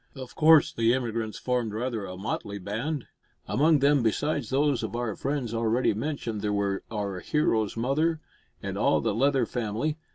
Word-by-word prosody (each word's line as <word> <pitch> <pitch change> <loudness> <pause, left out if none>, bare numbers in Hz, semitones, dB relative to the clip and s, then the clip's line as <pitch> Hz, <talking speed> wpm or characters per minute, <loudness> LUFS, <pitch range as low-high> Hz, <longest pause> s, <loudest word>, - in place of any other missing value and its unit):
Of 130 -2 -8
course 155 -1 +5
the 115 +1 +3
emigrants 115 -3 -3
formed 125 -4 -1
rather 115 -3 -2
a 90 0 -7
motley 100 0 -4
band. 115 - -3 0.4
Among 155 +4 +4
them, 140 0 +4
besides 130 +2 0
those 140 -2 +2
of - - -4
our 120 -3 -2
friends 135 -4 -2
already 115 +2 +1
mentioned, 115 -3 -3
there 105 0 -1
were 100 -1 0
our 100 -4 -3
hero's 110 -5 0
mother 155 +7 +1 0.4
and - - -4
all - - +3
the - - 0
Leather 135 +4 +2
family. 120 +7 -2
120 Hz, 165 wpm, -27 LUFS, 110-145 Hz, 0.4 s, course